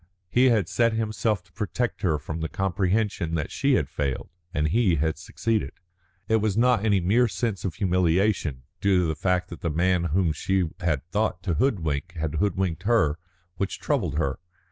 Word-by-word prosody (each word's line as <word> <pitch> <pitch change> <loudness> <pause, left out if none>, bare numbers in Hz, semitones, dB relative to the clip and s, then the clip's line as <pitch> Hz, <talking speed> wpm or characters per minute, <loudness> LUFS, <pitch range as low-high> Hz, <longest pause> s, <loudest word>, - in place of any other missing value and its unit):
He 125 +2 +4
had 110 -8 +3
set 115 +2 +2
himself 110 -2 -1
to 85 - -28
protect 105 +5 -2
her 85 -7 +2
from 80 +2 -6
the 80 0 -3
comprehension 95 -2 0
that 75 -3 -2
she - - +2
had - - +1
failed, 70 -3 -3 0.2
and 75 -4 0
he 100 -2 +3
had 80 +1 -1
succeeded. 110 -3 -2 0.5
It 110 - +3
was 110 -2 0
not 120 -3 +3
any 105 -3 +3
mere 110 +8 +3
sense 100 +1 -2
of 90 - -2
humiliation, 90 -6 +1 0.2
due 95 -2 +3
to - - +1
the 80 - 0
fact 90 +1 0
that 85 - -8
the 85 - -1
man 85 +2 +1
whom 85 +1 +1
she 90 +1 0
had 75 -6 -1
thought 105 -4 0
to 90 - 0
hoodwink 90 - 0
had 80 -2 -3
hoodwinked 95 -3 0
her, 90 -8 +2 0.4
which 100 - -2
troubled 75 - -1
her. 70 -4 -1
90 Hz, 185 wpm, -25 LUFS, 80-105 Hz, 0.5 s, He